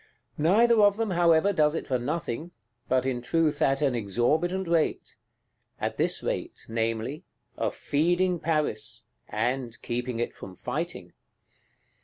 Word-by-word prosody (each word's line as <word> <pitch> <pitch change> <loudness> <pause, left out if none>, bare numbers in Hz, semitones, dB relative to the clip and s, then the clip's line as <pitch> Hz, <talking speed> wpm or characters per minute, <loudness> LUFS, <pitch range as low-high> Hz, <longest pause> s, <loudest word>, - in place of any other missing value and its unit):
Neither 220 +8 +5
of 205 0 +5
them, 225 -3 -1
however, 170 +2 +4
does 150 -2 +3
it - - -3
for 130 -2 0
nothing; 150 +2 -3 0.4
but, 130 0 +2
in 125 -2 -1
truth, 150 +3 +1
at 135 +2 +2
an 135 -3 +2
exorbitant 150 - 0
rate. 165 -2 0 0.6
At - - -2
this - - 0
rate, - - -4
namely: 115 +5 -2 0.3
of - - -2
feeding 175 +4 +1
Paris, 150 -10 -1 0.3
and 120 +2 -2
keeping 120 0 -3
it 120 - -2
from 95 - -10
fighting. 125 - -4
150 Hz, 135 wpm, -27 LUFS, 120-170 Hz, 0.6 s, Neither